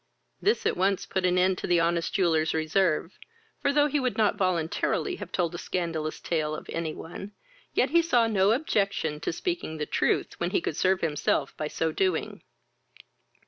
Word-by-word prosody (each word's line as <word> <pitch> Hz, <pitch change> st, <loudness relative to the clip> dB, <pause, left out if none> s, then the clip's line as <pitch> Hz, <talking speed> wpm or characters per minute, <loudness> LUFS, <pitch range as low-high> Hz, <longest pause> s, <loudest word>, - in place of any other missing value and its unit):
This 430 Hz, +3 st, +1 dB
at -, -, +2 dB
once 190 Hz, +1 st, +1 dB
put 185 Hz, -1 st, 0 dB
an 180 Hz, 0 st, +2 dB
end 185 Hz, 0 st, +2 dB
to -, -, -4 dB
the 175 Hz, -1 st, +3 dB
honest 170 Hz, 0 st, +1 dB
jeweller's 160 Hz, -4 st, +2 dB
reserve; 160 Hz, +2 st, 0 dB, 0.4 s
for, 280 Hz, -, +2 dB
though 290 Hz, 0 st, +4 dB
he 295 Hz, 0 st, +1 dB
would 255 Hz, -2 st, -1 dB
not 215 Hz, -2 st, +3 dB
voluntarily 185 Hz, -, 0 dB
have -, -, -8 dB
told 175 Hz, -2 st, 0 dB
a 170 Hz, -, -5 dB
scandalous 165 Hz, -3 st, -3 dB
tale 155 Hz, -2 st, -1 dB
of -, -, -9 dB
any 165 Hz, -2 st, -3 dB
one, 195 Hz, +5 st, -8 dB, 0.4 s
yet 255 Hz, -, +2 dB
he 340 Hz, +1 st, +5 dB
saw 250 Hz, -9 st, +3 dB
no 200 Hz, -3 st, +3 dB
objection 200 Hz, -, 0 dB
to -, -, -2 dB
speaking 340 Hz, -, -3 dB
the 150 Hz, -, -2 dB
truth -, -, 0 dB
when -, -, 0 dB
he -, -, +1 dB
could 335 Hz, -, -3 dB
serve 185 Hz, 0 st, +2 dB
himself 150 Hz, -3 st, 0 dB
by 155 Hz, -, -3 dB
so 160 Hz, +1 st, -1 dB
doing. 185 Hz, 0 st, -1 dB
180 Hz, 185 wpm, -27 LUFS, 160-215 Hz, 0.4 s, he